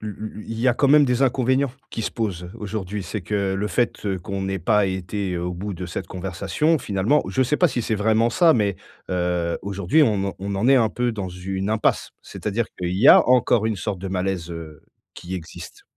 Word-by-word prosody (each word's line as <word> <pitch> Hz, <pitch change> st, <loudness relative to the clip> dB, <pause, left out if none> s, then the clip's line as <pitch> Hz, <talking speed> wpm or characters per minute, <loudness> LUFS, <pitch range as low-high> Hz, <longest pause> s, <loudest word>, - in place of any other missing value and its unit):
lu 105 Hz, -1 st, -5 dB
lu 110 Hz, +3 st, -7 dB
lu 105 Hz, -, -10 dB
il 115 Hz, 0 st, -5 dB
y 130 Hz, -, +3 dB
a 120 Hz, -, +3 dB
quand 140 Hz, -, +2 dB
même 145 Hz, +1 st, +6 dB
des 125 Hz, 0 st, +1 dB
inconvénients 130 Hz, +1 st, +2 dB, 0.2 s
qui 115 Hz, -, -4 dB
se -, -, -2 dB
posent 90 Hz, -6 st, -4 dB
aujourd'hui, 105 Hz, -1 st, -4 dB
c'est 95 Hz, +4 st, -5 dB
que 95 Hz, +1 st, -1 dB
le 105 Hz, +2 st, -1 dB
fait 120 Hz, -3 st, -1 dB, 0.2 s
qu'on 95 Hz, +2 st, -4 dB
n'ait 95 Hz, 0 st, -2 dB
pas 105 Hz, +3 st, +3 dB
été 95 Hz, 0 st, -3 dB
au 90 Hz, +1 st, -3 dB
bout 95 Hz, +2 st, -5 dB
de 90 Hz, +1 st, -6 dB
cette 85 Hz, 0 st, -5 dB
conversation 95 Hz, -, -1 dB
finalement 110 Hz, +5 st, +1 dB
je 130 Hz, -, +1 dB
sais 150 Hz, +4 st, +1 dB
pas 180 Hz, -, +4 dB
si 120 Hz, -2 st, -2 dB
c'est 110 Hz, -, -1 dB
vraiment 110 Hz, +3 st, +2 dB
ça, 170 Hz, +2 st, +5 dB
mais 105 Hz, -, +1 dB, 0.3 s
heu, 90 Hz, -1 st, -1 dB
aujourd'hui 100 Hz, -, +2 dB
on 100 Hz, -4 st, 0 dB
en -, -, -6 dB
on 100 Hz, +1 st, -4 dB
en 110 Hz, +6 st, +1 dB
est 135 Hz, -, +6 dB
un 115 Hz, -3 st, +4 dB
peu 120 Hz, +3 st, -1 dB
dans 100 Hz, -4 st, -4 dB
une 95 Hz, +2 st, -4 dB
impasse. 110 Hz, 0 st, +1 dB
C'est-à-dire 110 Hz, +2 st, -3 dB
qu'il 90 Hz, 0 st, -2 dB
y 115 Hz, +8 st, +5 dB
a -, -, +8 dB
encore 120 Hz, -3 st, +4 dB
une 110 Hz, -2 st, -1 dB
sorte 100 Hz, 0 st, -3 dB
de 95 Hz, -, -5 dB
malaise, 90 Hz, -2 st, -2 dB
heu, 80 Hz, -3 st, -9 dB, 0.3 s
qui 90 Hz, +2 st, -7 dB
existe. 85 Hz, -3 st, -9 dB
100 Hz, 225 wpm, -23 LUFS, 95-115 Hz, 0.3 s, a